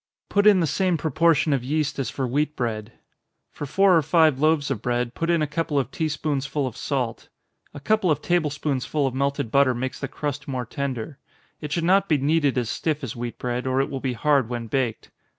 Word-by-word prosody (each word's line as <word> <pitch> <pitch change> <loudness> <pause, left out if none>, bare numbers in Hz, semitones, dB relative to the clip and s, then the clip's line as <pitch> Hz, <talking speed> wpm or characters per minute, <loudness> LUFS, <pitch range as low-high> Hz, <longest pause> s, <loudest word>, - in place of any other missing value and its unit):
Put 205 +1 +3
in 200 -3 +6
the - - +2
same 180 +3 +1
proportion 160 0 +2
of 130 -3 0
yeast 150 +2 -1
as 135 - -1
for 135 - -3
wheat 150 +4 0
bread. 110 -2 -3 0.6
For 145 - -6
four 195 +5 +4
or 165 - +5
five 155 -2 +3
loaves 155 -2 +2
of 115 -6 -2
bread, 120 0 -1
put 165 +5 -3
in 170 -2 +3
a - - +2
couple 150 0 -2
of 135 -2 0
tea 160 -2 -1
spoonsful 145 -2 -2
of 125 - -5
salt. 125 -5 -3 0.5
A - - -6
couple 215 +3 +1
of 150 - +2
table 175 -3 +1
spoonsful 145 0 -1
of 130 - -1
melted 140 -2 -1
butter 140 -2 +4
makes 130 +2 -4
the 135 - -3
crust 145 +1 -5
more 130 -3 -3
tender. 135 +1 -4 0.4
It 150 -1 -6
should 170 +2 0
not 195 +3 +3
be 155 - +4
kneaded 145 -1 +1
as 120 -2 0
stiff 150 +5 -2
as 120 -3 -5
wheat 120 0 -5
bread, 125 +1 -3
or 130 +1 +1
it 135 - 0
will 135 - -3
be 130 -1 -2
hard 140 -1 +2
when 120 -1 -4
baked. 115 -1 -2
140 Hz, 220 wpm, -24 LUFS, 130-155 Hz, 0.6 s, in